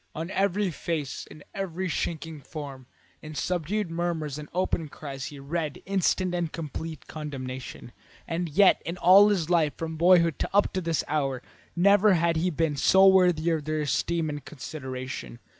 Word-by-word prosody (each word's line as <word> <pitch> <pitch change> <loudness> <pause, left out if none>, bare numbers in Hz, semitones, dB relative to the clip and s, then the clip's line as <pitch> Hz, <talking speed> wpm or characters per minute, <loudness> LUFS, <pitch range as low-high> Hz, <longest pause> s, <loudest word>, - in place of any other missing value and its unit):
On 165 +4 -4
every 195 0 +1
face, 155 -3 -4
in 150 - -13
every 190 -1 -3
shrinking 160 -2 -3
form, 140 -4 -8 0.3
in 155 0 -9
subdued 180 +4 -2
murmurs 165 -4 -2
and 150 - -9
open 175 -3 -1
cries, 135 -2 -7
he 145 - -8
read 150 +2 -4
instant 185 -1 +1
and 170 -2 -1
complete 160 -1 -6
condemnation, 130 -5 -7 0.4
and 170 +1 -2
yet 190 +6 +5
in 170 +2 -5
all 190 +4 +7
his 180 -5 0
life 160 -4 +2
from 160 -1 -5
boyhood 170 -2 +4
up 205 +1 +2
to 185 - -1
this 165 -3 0
hour, 135 -4 -1 0.3
never 200 +2 +5
had 170 0 +2
he 175 +3 +1
been 160 -2 0
so 190 +7 +5
worthy 180 -4 +5
of 155 -3 -1
their 155 0 -1
esteem 160 +3 0
and 145 -2 -5
consideration. 130 - -7
165 Hz, 160 wpm, -27 LUFS, 150-180 Hz, 0.4 s, all